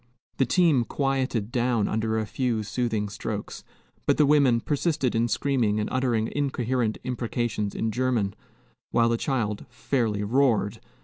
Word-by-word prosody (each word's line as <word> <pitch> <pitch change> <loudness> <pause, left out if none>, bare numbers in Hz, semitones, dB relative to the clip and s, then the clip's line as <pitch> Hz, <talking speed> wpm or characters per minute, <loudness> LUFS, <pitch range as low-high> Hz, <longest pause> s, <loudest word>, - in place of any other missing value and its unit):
The 135 - +2
team 160 -6 +4
quieted 130 -4 -1
down 120 -3 +1
under 110 0 0
a 110 - 0
few 120 -1 -1
soothing 110 -1 -1
strokes; 105 +1 -5 0.4
but - - +3
the 150 - +5
women 140 -5 +4
persisted 145 0 0
in 115 +1 +2
screaming 115 -3 +1
and 105 - -1
uttering 120 -4 0
incoherent 125 -5 0
imprecations 120 -4 -2
in 110 - -1
German, 120 -4 0 0.6
while 115 0 +3
the 115 - +1
child 115 -6 -2
fairly 120 -4 -1
roared. 115 -2 +2
120 Hz, 140 wpm, -26 LUFS, 110-130 Hz, 0.6 s, the